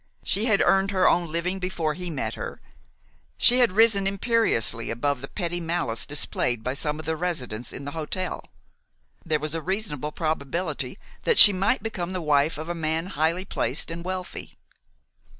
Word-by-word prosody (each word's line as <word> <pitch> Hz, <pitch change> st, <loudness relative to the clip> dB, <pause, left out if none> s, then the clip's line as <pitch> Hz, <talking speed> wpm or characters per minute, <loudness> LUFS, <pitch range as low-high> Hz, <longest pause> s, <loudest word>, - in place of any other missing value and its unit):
She 210 Hz, +3 st, +1 dB
had 215 Hz, -4 st, +3 dB
earned 195 Hz, +2 st, +3 dB
her 185 Hz, -2 st, +2 dB
own 170 Hz, -2 st, +2 dB
living 180 Hz, +3 st, -2 dB
before 175 Hz, -4 st, -2 dB
he 180 Hz, +2 st, -6 dB
met 155 Hz, -, -3 dB
her; -, -, -7 dB, 0.8 s
she 250 Hz, +1 st, +6 dB
had 240 Hz, -6 st, +3 dB
risen 210 Hz, -2 st, +4 dB
imperiously 195 Hz, -, +1 dB
above 125 Hz, +3 st, -1 dB
the 135 Hz, -, -6 dB
petty 175 Hz, 0 st, -3 dB
malice 165 Hz, -9 st, -2 dB
displayed 125 Hz, -5 st, -1 dB
by 125 Hz, -, -2 dB
some 150 Hz, +2 st, -1 dB
of 155 Hz, -, -8 dB
the 160 Hz, +1 st, -1 dB
residents 130 Hz, -10 st, -3 dB
in 140 Hz, -, -7 dB
the 145 Hz, -, -5 dB
hotel; 165 Hz, +4 st, -4 dB, 0.8 s
there 155 Hz, -3 st, 0 dB
was 155 Hz, +1 st, -4 dB
a 165 Hz, -, -3 dB
reasonable 155 Hz, -6 st, -3 dB
probability 155 Hz, -1 st, -3 dB, 0.2 s
that 470 Hz, -, +1 dB
she 205 Hz, -, +12 dB
might 195 Hz, +5 st, 0 dB
become 185 Hz, -5 st, -4 dB
the 185 Hz, -, -2 dB
wife 150 Hz, -1 st, +1 dB
of 155 Hz, +1 st, -6 dB
a 175 Hz, -, -2 dB
man 160 Hz, 0 st, -2 dB
highly 160 Hz, +5 st, 0 dB
placed 135 Hz, -1 st, -2 dB
and 170 Hz, +1 st, -6 dB
wealthy. 185 Hz, 0 st, -6 dB
170 Hz, 175 wpm, -25 LUFS, 150-185 Hz, 0.8 s, she